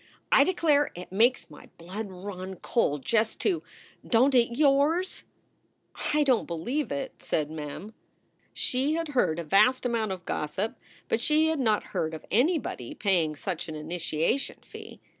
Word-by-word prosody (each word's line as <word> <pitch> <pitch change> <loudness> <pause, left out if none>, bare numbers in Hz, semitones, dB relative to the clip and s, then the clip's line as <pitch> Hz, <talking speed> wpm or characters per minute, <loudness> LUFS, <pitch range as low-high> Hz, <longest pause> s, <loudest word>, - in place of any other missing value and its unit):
"I - - +7
declare 310 -6 +2
it 180 +1 -9
makes 225 -1 +2
my 150 - -14
blood 190 +6 -6
run 190 0 -7
cold 150 - -1
just 225 -1 +1
to 365 -5 +1 0.4
Don 255 +4 +3
t 255 - +6
it 235 0 -4
yours?" 300 +5 +2 0.9
"I 300 - +4
don 260 -5 +4
t - - -9
believe 240 - -2
it," 270 -2 -5
said 150 -1 -1
Mem. 155 +7 -7 0.6
She 270 +5 0
had 330 -1 -2
heard 245 - +1
a 170 - -3
vast 250 +11 +3
amount 230 -4 0
of 185 -1 -6
gossip, 185 +9 -2 0.3
but 225 - 0
she 310 +4 +3
had 320 -2 -1
not 220 -5 +2
heard 160 -4 -1
of 155 - -10
anybody 250 - 0
paying 175 -7 +1
such 175 +2 -4
an 155 - -5
initiation 165 - -2
fee. - - -11
220 Hz, 160 wpm, -27 LUFS, 170-275 Hz, 0.9 s, I